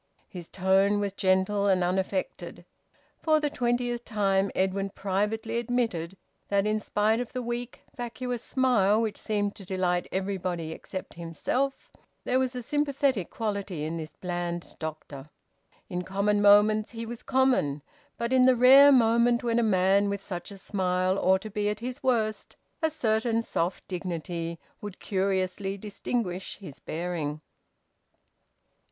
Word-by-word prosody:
His 175 Hz, -3 st, -9 dB
tone 195 Hz, +2 st, +3 dB
was 200 Hz, -1 st, -2 dB
gentle 195 Hz, +1 st, +2 dB
and 185 Hz, -2 st, +3 dB
unaffected. 185 Hz, +1 st, -2 dB, 0.6 s
For 310 Hz, -1 st, +3 dB
the 295 Hz, -1 st, -1 dB
twentieth 240 Hz, -1 st, -1 dB
time 195 Hz, -3 st, +1 dB
Edwin 195 Hz, +1 st, 0 dB
privately 210 Hz, +4 st, -1 dB
admitted 225 Hz, -8 st, -2 dB, 0.3 s
that 200 Hz, 0 st, +1 dB
in 215 Hz, 0 st, +1 dB
spite 215 Hz, +2 st, +1 dB
of 245 Hz, -, -5 dB
the 255 Hz, -, -2 dB
weak, 240 Hz, +1 st, -5 dB
vacuous 245 Hz, 0 st, -4 dB
smile 230 Hz, -7 st, +2 dB
which 220 Hz, -2 st, -1 dB
seemed 205 Hz, -1 st, -1 dB
to 200 Hz, -, -10 dB
delight 180 Hz, -1 st, -1 dB
everybody 185 Hz, -4 st, -2 dB
except 185 Hz, +3 st, -7 dB
himself, 210 Hz, +11 st, -3 dB, 0.3 s
there 255 Hz, -, +1 dB
was 260 Hz, -1 st, -1 dB
a 250 Hz, -, -4 dB
sympathetic 275 Hz, -, 0 dB
quality 200 Hz, -7 st, -3 dB
in 160 Hz, +2 st, -3 dB
this 155 Hz, -1 st, -5 dB
bland 175 Hz, -1 st, -4 dB
doctor. 155 Hz, -3 st, -7 dB, 0.6 s
In 180 Hz, -2 st, -3 dB
common 200 Hz, +3 st, +1 dB
moments 210 Hz, +2 st, +5 dB
he 230 Hz, 0 st, -5 dB
was 235 Hz, 0 st, -7 dB
common, 250 Hz, -, +1 dB, 0.3 s
but 235 Hz, +2 st, -1 dB
in 255 Hz, -1 st, +6 dB
the 260 Hz, -, +6 dB
rare 270 Hz, +4 st, +8 dB
moment 235 Hz, -1 st, +4 dB
when 235 Hz, -1 st, +1 dB
a -, -, +3 dB
man 200 Hz, -1 st, +3 dB
with 200 Hz, 0 st, -3 dB
such 175 Hz, -3 st, -5 dB
a 200 Hz, -, -9 dB
smile 185 Hz, -1 st, 0 dB
ought 190 Hz, +1 st, +3 dB
to 215 Hz, -, -7 dB
be 210 Hz, 0 st, 0 dB
at 210 Hz, -, -3 dB
his 250 Hz, +3 st, -5 dB
worst, 225 Hz, -5 st, 0 dB, 0.3 s
a 320 Hz, -, +2 dB
certain 230 Hz, -5 st, 0 dB
soft 175 Hz, -4 st, -2 dB
dignity 170 Hz, -2 st, -4 dB, 0.2 s
would 205 Hz, -2 st, -7 dB
curiously 195 Hz, 0 st, -1 dB
distinguish 200 Hz, -2 st, -3 dB
his 155 Hz, -9 st, -11 dB
bearing. 160 Hz, -3 st, -3 dB
200 Hz, 145 wpm, -27 LUFS, 185-235 Hz, 0.6 s, rare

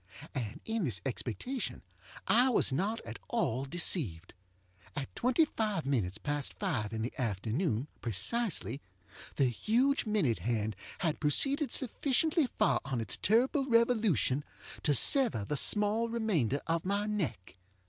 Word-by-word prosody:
And 120 Hz, -8 st, -4 dB
in 225 Hz, -2 st, -2 dB
this 115 Hz, -, +1 dB
expectation 135 Hz, -, -4 dB, 0.4 s
I 245 Hz, +3 st, +4 dB
was 235 Hz, -, +2 dB
not 200 Hz, +11 st, -1 dB
at -, -, -9 dB
all 135 Hz, -, -1 dB
deceived. 135 Hz, -, +2 dB, 0.6 s
At 140 Hz, -2 st, -6 dB
twenty 255 Hz, +6 st, +2 dB
five 210 Hz, -, -2 dB
minutes 110 Hz, -9 st, -1 dB
past 145 Hz, +1 st, -3 dB
five 125 Hz, -, -2 dB
in 110 Hz, -1 st, -3 dB
the 120 Hz, -, -4 dB
afternoon, 115 Hz, -, -1 dB
precisely, 150 Hz, -, 0 dB, 0.5 s
the 135 Hz, -, +3 dB
huge 235 Hz, -, +1 dB
minute 190 Hz, -, +1 dB
hand 110 Hz, -2 st, -2 dB, 0.3 s
had 165 Hz, -5 st, -1 dB
proceeded 275 Hz, -, +1 dB
sufficiently 285 Hz, -, +1 dB
far 215 Hz, -4 st, +2 dB
on 135 Hz, -3 st, -3 dB
its 110 Hz, -3 st, -1 dB
terrible 260 Hz, +6 st, +2 dB
revolution 220 Hz, -, +2 dB, 0.4 s
to 145 Hz, -, +2 dB
sever 230 Hz, -, +5 dB
the 150 Hz, -, -2 dB
small 210 Hz, -, +2 dB
remainder 185 Hz, -, 0 dB
of 165 Hz, 0 st, -1 dB
my 200 Hz, +2 st, -1 dB
neck. 155 Hz, -, -4 dB
170 Hz, 135 wpm, -31 LUFS, -, 0.6 s, sever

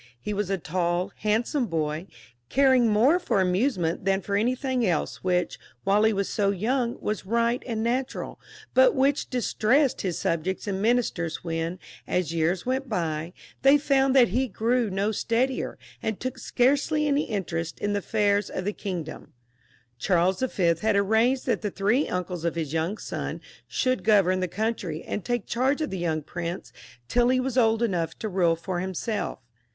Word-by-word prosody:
He 210 Hz, -, -4 dB
was 205 Hz, -1 st, -2 dB
a 195 Hz, -, +1 dB
tail, 175 Hz, +2 st, -1 dB
handsome 230 Hz, +5 st, 0 dB
boy, 155 Hz, 0 st, -2 dB, 0.4 s
caring 260 Hz, -3 st, +4 dB
more 245 Hz, +12 st, +4 dB
for 345 Hz, -, 0 dB
amusement 185 Hz, -2 st, +1 dB
than 195 Hz, 0 st, +2 dB
for 200 Hz, +2 st, -2 dB
anything 255 Hz, +3 st, 0 dB
else, 175 Hz, -7 st, -1 dB
which, 180 Hz, -1 st, 0 dB, 0.3 s
whfle 205 Hz, +2 st, +4 dB
he -, -, +3 dB
was 200 Hz, -2 st, -1 dB
so 200 Hz, -2 st, +1 dB
young, 235 Hz, +5 st, 0 dB
was 210 Hz, -, -3 dB
right 235 Hz, +2 st, +1 dB
and 225 Hz, -2 st, -2 dB
natural, 250 Hz, +3 st, -2 dB, 0.3 s
but -, -, +5 dB
which 275 Hz, +2 st, +1 dB
distressed 250 Hz, +2 st, +1 dB
his 180 Hz, -4 st, -2 dB
subjects 170 Hz, +3 st, -1 dB
and 195 Hz, -2 st, -2 dB
ministers 215 Hz, -8 st, 0 dB
when, 165 Hz, +1 st, -2 dB, 0.3 s
as 175 Hz, -3 st, -1 dB
years 170 Hz, +2 st, 0 dB
went 260 Hz, +1 st, -1 dB
by, 165 Hz, -5 st, -2 dB, 0.3 s
they 275 Hz, +2 st, +6 dB
found 275 Hz, -2 st, +2 dB
that 245 Hz, -4 st, +6 dB
he 255 Hz, +7 st, +1 dB
grew 235 Hz, +2 st, 0 dB
no 195 Hz, +3 st, 0 dB
steadier, 240 Hz, +5 st, -1 dB, 0.2 s
and 220 Hz, -2 st, -2 dB
took 255 Hz, 0 st, -4 dB
scarcely 285 Hz, +6 st, +1 dB
any 290 Hz, +1 st, +2 dB
interest 170 Hz, -6 st, -3 dB
in 205 Hz, 0 st, -1 dB
the 205 Hz, -, +1 dB
affairs 205 Hz, 0 st, +1 dB
of 185 Hz, -, -4 dB
the 205 Hz, -, -1 dB
kindom. 175 Hz, -7 st, -6 dB, 0.7 s
Charles 180 Hz, -, +2 dB, 0.2 s
Y. 170 Hz, -3 st, +3 dB
had 220 Hz, -1 st, +2 dB
arranged 220 Hz, +6 st, +2 dB
that -, -, 0 dB
the 210 Hz, -, -1 dB
three 210 Hz, +9 st, +1 dB
uncles 180 Hz, -2 st, -3 dB
of 170 Hz, -1 st, -1 dB
his 160 Hz, -3 st, -3 dB
young 165 Hz, +6 st, -1 dB
son -, -, -5 dB, 0.3 s
should 255 Hz, -1 st, 0 dB
govern 195 Hz, -4 st, +4 dB
the 185 Hz, -, 0 dB
country, 190 Hz, -5 st, -3 dB
and 210 Hz, -, -4 dB
take 240 Hz, -4 st, -2 dB
charge 265 Hz, +5 st, +1 dB
of 310 Hz, -, -2 dB
the 190 Hz, -, -3 dB
young 160 Hz, -3 st, -1 dB
prince 175 Hz, +3 st, -5 dB, 0.3 s
till 240 Hz, -, +3 dB
he 255 Hz, 0 st, +3 dB
was 255 Hz, -1 st, -2 dB
old 225 Hz, -2 st, +3 dB
enough 175 Hz, -7 st, -1 dB
to 220 Hz, -, -4 dB
rule 180 Hz, -4 st, +2 dB
for 175 Hz, +2 st, -4 dB
him 185 Hz, +1 st, -4 dB
self. 215 Hz, +3 st, -2 dB
205 Hz, 175 wpm, -26 LUFS, 180-245 Hz, 0.7 s, they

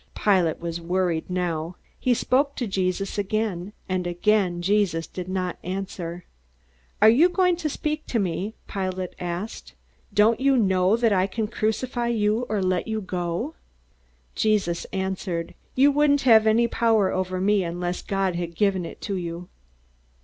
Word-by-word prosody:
Pilate 185 Hz, -6 st, +2 dB
was 170 Hz, 0 st, -4 dB
worried 175 Hz, -1 st, -1 dB
now. 175 Hz, -2 st, -2 dB, 0.2 s
He 250 Hz, -1 st, +2 dB
spoke 275 Hz, +4 st, +1 dB
to 245 Hz, -, -2 dB
Jesus 195 Hz, 0 st, -1 dB
again, 200 Hz, -2 st, -2 dB, 0.2 s
and 185 Hz, -2 st, -1 dB
again 175 Hz, -1 st, +1 dB
Jesus 190 Hz, -4 st, +1 dB
did 180 Hz, -1 st, -7 dB
not 185 Hz, -1 st, -2 dB
answer. 180 Hz, -2 st, -5 dB, 0.8 s
"Aren't 220 Hz, +2 st, +7 dB
you 340 Hz, +5 st, +6 dB
going 360 Hz, -1 st, +2 dB
to 320 Hz, -3 st, -2 dB
speak 305 Hz, +1 st, -3 dB
to 240 Hz, -, -1 dB
me?" 195 Hz, +1 st, -2 dB
Pilate 185 Hz, -2 st, -3 dB
asked. 180 Hz, +5 st, -5 dB, 0.4 s
"Don't 215 Hz, +3 st, +4 dB
you 270 Hz, 0 st, +3 dB
know 190 Hz, -1 st, +3 dB
that 230 Hz, -3 st, +3 dB
I 185 Hz, 0 st, +2 dB
can 215 Hz, +2 st, -2 dB
crucify 235 Hz, +3 st, -1 dB
you 225 Hz, +1 st, +1 dB
or 210 Hz, -3 st, 0 dB
let 185 Hz, +1 st, 0 dB
you 220 Hz, -1 st, -1 dB
go?" 180 Hz, -, -3 dB, 0.8 s
Jesus 205 Hz, -6 st, +1 dB
answered, 190 Hz, -3 st, -3 dB, 0.2 s
"You 275 Hz, +3 st, +5 dB
wouldn't 285 Hz, 0 st, +3 dB
have 220 Hz, -3 st, +6 dB
any 230 Hz, +2 st, +4 dB
power 225 Hz, -4 st, +2 dB
over 185 Hz, 0 st, -2 dB
me 200 Hz, +1 st, +2 dB
unless 175 Hz, +1 st, -3 dB
God 195 Hz, -2 st, -1 dB
had 170 Hz, -1 st, -4 dB
given 190 Hz, -2 st, +1 dB
it -, -, -11 dB
to 200 Hz, -2 st, -3 dB
you." 175 Hz, 0 st, -6 dB
195 Hz, 155 wpm, -24 LUFS, 180-220 Hz, 0.8 s, Aren't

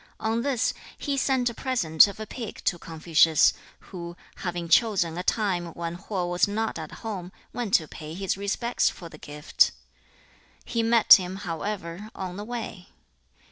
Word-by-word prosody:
On 225 Hz, +1 st, 0 dB
this, 260 Hz, -3 st, 0 dB, 0.2 s
he 285 Hz, -2 st, -2 dB
sent 260 Hz, -3 st, +1 dB
a -, -, -11 dB
present 205 Hz, -12 st, +4 dB
of 200 Hz, +1 st, -8 dB
a 215 Hz, -, -4 dB
pig 225 Hz, 0 st, -7 dB
to 175 Hz, -, +1 dB
Confucius, 160 Hz, -1 st, +3 dB, 0.4 s
who, 175 Hz, -1 st, -7 dB, 0.2 s
having 175 Hz, -1 st, -4 dB
chosen 175 Hz, -2 st, +3 dB
a 180 Hz, -, -3 dB
time 185 Hz, -3 st, 0 dB
when 170 Hz, 0 st, -4 dB
Ho 185 Hz, 0 st, -3 dB
was 175 Hz, +2 st, +2 dB
not 215 Hz, -2 st, -2 dB
at 155 Hz, -1 st, -7 dB
home, 190 Hz, -5 st, -5 dB, 0.2 s
went 240 Hz, -5 st, 0 dB
to 160 Hz, -, +2 dB
pay 155 Hz, +1 st, -9 dB
his 195 Hz, 0 st, -1 dB
respects 200 Hz, +5 st, 0 dB
for 170 Hz, -3 st, -10 dB
the 155 Hz, -, -13 dB
gift. 150 Hz, +2 st, +1 dB, 1.0 s
He 230 Hz, -, -1 dB
met 230 Hz, 0 st, +7 dB
him, 185 Hz, -1 st, +4 dB
however, 180 Hz, +2 st, -4 dB
on 185 Hz, -2 st, -5 dB
the 205 Hz, -, -6 dB
way. 225 Hz, -5 st, -6 dB
190 Hz, 165 wpm, -26 LUFS, 170-225 Hz, 1.0 s, met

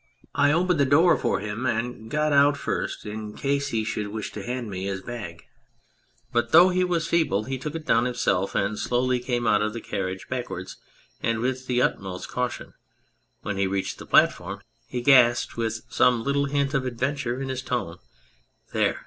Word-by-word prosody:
I 145 Hz, 0 st, +3 dB
opened 175 Hz, +1 st, +2 dB
the 140 Hz, -, +5 dB
door 160 Hz, +6 st, +5 dB
for -, -, -1 dB
him 105 Hz, +4 st, -3 dB
and 115 Hz, -1 st, -3 dB
got 150 Hz, +3 st, +1 dB
out 140 Hz, 0 st, +5 dB
first -, -, -3 dB
in 105 Hz, 0 st, -6 dB
case 140 Hz, 0 st, 0 dB
he 115 Hz, -5 st, -1 dB
should 105 Hz, -1 st, -3 dB
wish 105 Hz, +1 st, -5 dB
to -, -, -7 dB
hand 125 Hz, -1 st, -4 dB
me 95 Hz, -2 st, -5 dB
his 95 Hz, -1 st, -3 dB
bag. 105 Hz, -9 st, -7 dB, 0.9 s
But 120 Hz, 0 st, +1 dB
though 175 Hz, +3 st, +8 dB
he 185 Hz, 0 st, +1 dB
was 175 Hz, -3 st, 0 dB
feeble 155 Hz, -, +1 dB
he 130 Hz, +3 st, -4 dB
took 150 Hz, +4 st, -5 dB
it 160 Hz, -1 st, -5 dB
down 115 Hz, -5 st, +3 dB
himself 100 Hz, -6 st, 0 dB
and 100 Hz, +2 st, 0 dB
slowly 125 Hz, +1 st, +1 dB
came 120 Hz, -1 st, -2 dB
out 105 Hz, -2 st, +3 dB
of 105 Hz, 0 st, -1 dB
the 115 Hz, -, -4 dB
carriage 95 Hz, -3 st, -4 dB
back 125 Hz, -1 st, -3 dB
wards 90 Hz, +1 st, -7 dB, 0.4 s
and 115 Hz, -1 st, 0 dB
with 130 Hz, +2 st, -2 dB
the 125 Hz, 0 st, +2 dB
utmost 95 Hz, -2 st, -2 dB
caution; 125 Hz, -1 st, -3 dB, 0.7 s
when 105 Hz, -1 st, -3 dB
he 100 Hz, 0 st, +1 dB
reached 95 Hz, 0 st, -2 dB
the -, -, -10 dB
platform -, -, +3 dB, 0.3 s
he 125 Hz, -, -4 dB
gasped, 120 Hz, -2 st, +5 dB
with 110 Hz, -1 st, -2 dB
some 120 Hz, -2 st, +3 dB
little 140 Hz, +1 st, +1 dB
hint 140 Hz, 0 st, 0 dB
of 135 Hz, -3 st, +1 dB
adventure 130 Hz, 0 st, -2 dB
in 135 Hz, -1 st, -4 dB
his 130 Hz, -1 st, -3 dB
tone, 115 Hz, -10 st, -3 dB, 0.4 s
" -, -, -35 dB
There -, -, +1 dB
120 Hz, 195 wpm, -25 LUFS, 105-140 Hz, 0.9 s, though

